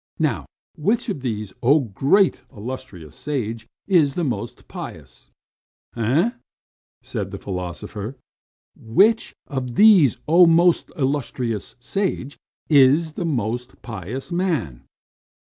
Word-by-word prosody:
Now, 115 - -1 0.3
which 215 +10 0
of 185 -10 -3
these, 110 -6 -4
oh, 130 -4 +3
most 190 +8 +4
illustrious 100 - -8
sage, 115 -6 -4 0.2
is 160 -8 +3
the 175 - -1
more 120 -6 -1 0.2
pious - - -10 0.7
man?" 120 +7 +2
"Eh?" 120 - -1 0.7
said - - -4
the - - -6
philosopher. 100 +5 -6 0.6
"Which 205 - +2
of 125 -4 -4
these, 190 - +6
oh, 170 +3 +7
most 170 +1 +4
illustrious 130 -6 -2
sage, 145 -1 -3 0.3
is 150 +2 +5
the 175 - -3
more 120 -6 0 0.2
pious 115 - -6
man?" 145 - -1
130 Hz, 110 wpm, -22 LUFS, 110-165 Hz, 0.7 s, oh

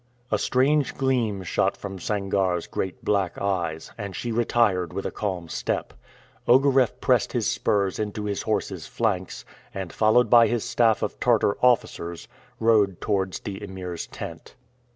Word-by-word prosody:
A 105 - +2
strange 140 +5 +2
gleam 120 -8 0
shot 90 - 0
from 95 -1 -7
Sangarre's 95 -3 0
great 95 -1 -5
black 100 -4 0
eyes, 85 -5 -2
and 100 -2 -5
she 120 - -3
retired 110 -6 +1
with 100 - -4
a - - -2
calm 95 -5 -3
step. - - -3 0.5
Ogareff 130 -1 +4
pressed - - +2
his - - 0
spurs 100 -2 0
into 105 0 -3
his 100 -1 -2
horse's 95 -5 -2
flanks, 100 -6 -2 0.3
and, 95 -3 -5
followed 110 +2 +4
by 115 0 +7
his 120 0 -1
staff 115 -2 +2
of - - -3
Tartar 100 - +3
officers, 85 -9 +1 0.3
rode 105 -5 +3
towards 95 -3 -1
the 100 +1 -6
Emir's 95 -3 -6
tent. - - -9
100 Hz, 150 wpm, -25 LUFS, 95-115 Hz, 0.5 s, by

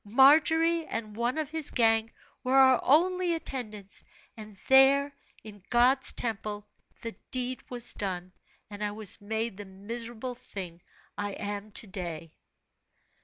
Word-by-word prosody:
Margery 320 +8 +4
and 215 -2 -5
one 240 +5 -1
of 305 -2 -3
his 315 -2 +2
gang 225 -2 +3 0.3
were 255 +1 +1
our 260 -2 +6
only 355 +4 +3
attendants, 215 -10 -6 0.3
and 215 -3 -11
there, 275 +2 +6 0.3
in 205 -2 -11
God's 255 +2 +3
temple, 210 -2 -4 0.4
the 230 - -4 0.2
deed 255 0 -2
was 245 -1 -2
done, 185 -2 -4 0.3
and 205 0 -7
I 210 - 0
was 215 -1 -1
made 220 0 -3
the 205 - -7
miserable 230 +5 -6
thing 190 -8 -8 0.4
I 205 -1 -2
am 205 +1 -5
to - - -3
day." 170 -5 -6
230 Hz, 135 wpm, -29 LUFS, 205-265 Hz, 0.4 s, our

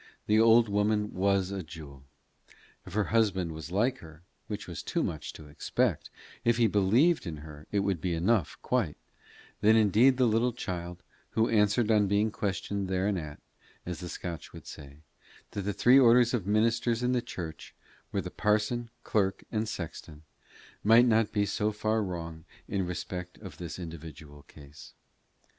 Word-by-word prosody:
The 105 +1 +3
old 115 +1 +6
woman 105 +1 0
was 95 0 +1
a 100 -1 -3
jewel. 75 -4 -11 0.8
If - - -9
her 105 +1 +2
husband 95 -7 +2
was 80 0 -7
like 120 +7 +1
her, 80 0 -14 0.2
which - - -5
was - - -6
too - - -1
much 80 -3 -4
to 75 - -11
expect 75 - -1 0.3
if 120 0 +3
he 120 - +4
believed 110 - +3
in 80 -2 -5
her, 75 -1 -12
it 100 - +1
would 100 -5 -1
be 90 -2 -1
enough, 90 +2 +1
quite 115 -12 0 0.6
then 110 +2 +5
indeed 115 +5 +5
the 130 - +4
little 115 +2 +2
child, 90 -6 -6 0.3
who 110 +1 +1
answered 105 +1 +3
on 105 -2 +4
being 105 +2 +2
questioned 100 -1 -3
thereanent, 95 -5 -2 0.4
as 90 -2 -5
the 90 - -6
Scotch 85 -2 -6
would - - -11
say, 70 +1 -11 0.5
that 100 - -3
the 100 +2 -2
three 125 +7 +5
orders 120 -1 +5
of 105 -7 -1
ministers 115 +2 +1
in 125 - +2
the 125 -1 +1
church 80 -7 -8 0.4
were - - -1
the - - -7
parson, 110 +3 0
clerk, 95 -3 0
and 110 -1 -1
sexton, 80 -4 -7 0.6
might 115 +3 +7
not 110 -2 +3
be 105 -1 +1
so 105 +2 0
far 110 +1 0
wrong 85 -4 -5 0.2
in 95 -3 -1
respect 90 0 -5
of 95 -8 -10
this 85 -2 -6
individual 80 -4 -9
case. 75 0 -14
100 Hz, 165 wpm, -29 LUFS, 85-110 Hz, 0.8 s, might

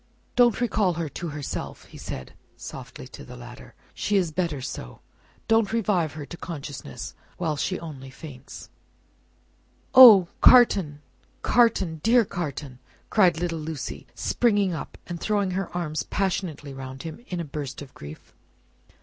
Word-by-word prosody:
"Don't 240 -3 +4
recall 215 -6 +1
her 165 -1 -3
to 170 +5 -5
herself," 145 -2 -5
he - - -14
said, 65 - -7 0.2
softly, - - -9
to - - -11
the - - -11
latter, - - -12 0.2
"she 205 - 0
is 175 -4 +1
better 165 -3 -1
so. 60 - -7 0.5
Don't 225 -2 +3
revive 195 -9 +1
her 150 -1 -7
to 175 - -9
consciousness, 145 - -7 0.2
while 160 -4 -1
she 185 +5 -2
only 140 -5 -8
faints." 135 -1 -11 1.2
"Oh, 220 -9 +10
Carton, 180 -12 +6 0.4
Carton, 195 -9 +3
dear 230 +3 +4
Carton!" 145 -7 -5 0.3
cried 180 -6 +4
little 170 -2 -2
Lucie, 155 -2 -6
springing 205 -6 +1
up 160 - -6
and 175 -1 -6
throwing 205 -3 0
her 190 0 -2
arms 155 -3 -2
passionately 175 -7 -2
round 135 0 -8
him, 165 +7 -8
in 180 - -4
a 170 - -3
burst 145 -3 -6
of 135 - -15
grief. 75 +2 -11
170 Hz, 145 wpm, -25 LUFS, 145-195 Hz, 1.2 s, Oh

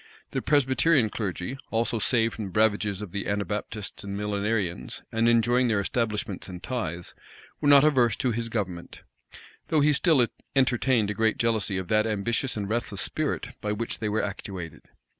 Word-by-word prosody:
The - - -1
Presbyterian 135 -2 +3
clergy, 100 +4 -3
also 115 0 0
saved 115 +2 +2
from 110 - -5
the 95 +2 -2
ravages 105 -2 +1
of 100 - -8
the 100 +1 -3
Anabaptists 105 0 -3
and 100 0 -5
Millenarians, 105 -3 -2
and 115 +1 +2
enjoying 120 +2 +3
their 110 -3 +2
establishments 105 -3 -2
and 90 -1 -8
tithes, 90 -9 -4 0.5
were 145 - +2
not 140 -1 +8
averse 125 -8 +4
to 130 -2 0
his 115 0 -3
government; 95 -6 -4 0.6
though 155 -2 +2
he 150 +1 +4
still 145 -4 +4 0.3
entertained 125 -4 +2
a - - -2
great 110 +1 +1
jealousy 110 -4 0
of 95 -1 -4
that 110 0 +3
ambitious 110 +4 -1
and 100 -2 -2
restless 110 -3 -2
spirit 155 -2 -2
by 105 - -2
which 115 +2 -4
they 110 - -1
were 110 +1 0
actuated. 90 -6 -6
110 Hz, 170 wpm, -26 LUFS, 100-120 Hz, 0.6 s, not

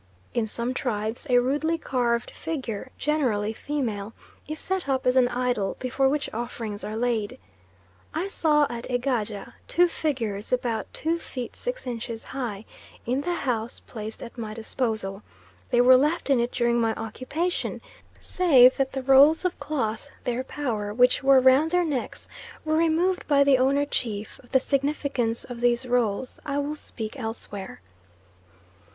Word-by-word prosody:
In 230 -2 0
some 235 +3 -2
tribes 225 0 -3
a 245 - +5
rudely 290 +7 +1
carved 240 -6 0
figure, 260 -7 -5
generally 240 -9 0
female, 225 -6 -3 0.3
is 310 +1 -4
set 370 -3 -3
up 265 -1 0
as 250 0 +3
an 255 -2 +5
idol 245 -5 -1
before 265 +1 +1
which 290 0 0
offerings 225 -2 -4
are 215 - -4
laid. 230 -3 -1 0.7
I 335 +5 -2
saw 300 -6 +3
at 235 0 -6
Egaja 240 -5 -2
two 355 +2 +4
figures 230 -12 -2
about 240 -3 -1
2 330 +2 +1
feet 250 -6 -6
6 - - -5
inches 230 -2 -5
high, 230 -6 -5 0.4
in 255 +4 0
the 350 +3 -1
house 240 -6 -2
placed 220 -1 -8
at 240 0 -9
my 215 -2 -5
disposal. 220 -3 -2 0.5
They 240 - +4
were 255 +1 +8
left 295 +2 +1
in 265 - +4
it 235 +1 0
during 235 -1 +2
my 225 -1 +1
occupation, 265 +10 -3 0.4
save 265 -9 +5
that 270 -1 0
the 265 -1 -3
rolls 280 +6 +6
of 365 - -1
cloth 225 -8 -2
(their 245 +1 -1
power) 230 -8 -3
which 250 +1 +4
were 270 -1 +6
round 260 +5 +5
their 355 +1 +2
necks, 280 -6 -3 0.4
were 310 0 +1
removed 335 +3 +2
by 280 -1 +5
the 275 -2 +4
owner 275 +2 +3
chief; 215 -7 -4
of 245 - -21
the 265 - +5
significance 275 -4 -1
of 240 -1 -8
these 240 +1 +2
rolls 245 -1 0
I 285 -2 -2
will 285 +1 -1
speak 220 -7 -7
elsewhere. 205 - -6
250 Hz, 160 wpm, -26 LUFS, 225-285 Hz, 0.7 s, were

